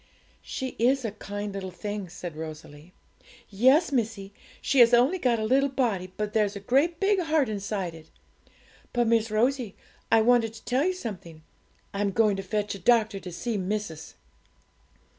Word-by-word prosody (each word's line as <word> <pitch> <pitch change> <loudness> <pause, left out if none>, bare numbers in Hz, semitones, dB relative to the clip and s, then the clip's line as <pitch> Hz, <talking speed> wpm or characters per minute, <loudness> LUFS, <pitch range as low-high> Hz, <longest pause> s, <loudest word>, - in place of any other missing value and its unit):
'She 260 -1 -4
is 255 +2 +2
a 220 - -2
kind 205 0 -6
little 195 -1 -5
thing!' 205 0 -5
said 175 -2 -7
Rosalie. 155 0 -9 0.6
'Yes, 260 - +4
missie; 220 -6 -2 0.3
she 275 - +1
has 240 0 +7
only 265 +10 +3
got 245 -6 +2
a 220 - -2
little 275 +4 +3
body, 215 -9 -1
but 210 0 -3
there's 210 -2 +1
a - - -5
great 280 - +1
kind 395 -1 +2
heart 315 -5 +1
inside 200 -4 -3
it. 160 -1 -14 0.8
But, 240 -1 +2
Miss 225 -1 +2
Rosie, 235 0 0 0.4
I 225 - +6
wanted 230 -1 +3
to 225 - -14
tell 260 +5 +1
you 370 - +1
something; 180 - -8 0.5
I'm 200 0 0
going 215 -2 +3
to - - -3
fetch 205 +2 -2
a 200 - -8
doctor 225 -2 +2
to 180 - -8
see 225 +6 -3
missis.' 185 -5 -4
215 Hz, 170 wpm, -27 LUFS, 195-250 Hz, 0.8 s, has